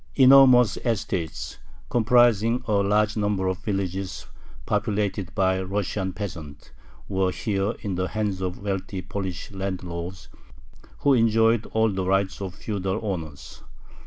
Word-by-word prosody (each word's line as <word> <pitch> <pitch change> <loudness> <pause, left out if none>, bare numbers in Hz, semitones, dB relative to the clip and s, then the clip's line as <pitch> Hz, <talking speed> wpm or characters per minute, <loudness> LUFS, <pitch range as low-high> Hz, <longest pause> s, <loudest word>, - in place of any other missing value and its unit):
Enormous 130 -3 +7
estates, 95 - -3 0.3
comprising 120 -1 +3
a - - -3
large 105 +2 +2
number 105 -3 0
of 95 0 -1
villages 95 -1 -3 0.4
populated 105 -2 -1
by 95 -1 +2
Russian 95 0 -2
peasants, 80 -8 -8 0.4
were 95 -1 0
here 100 +2 -1
in 100 -3 -3
the 95 +1 -1
hands 100 0 -2
of 90 -1 -3
wealthy 95 -1 -3
Polish 95 -1 -5
landlords, 90 -2 -5 0.7
who 140 - +4
enjoyed 115 -1 +3
all 110 -1 +1
the 95 -1 -2
rights 95 +1 0
of 95 -2 -5
feudal 95 -3 -3
owners. 80 -8 -6
100 Hz, 125 wpm, -25 LUFS, 95-110 Hz, 0.7 s, Enormous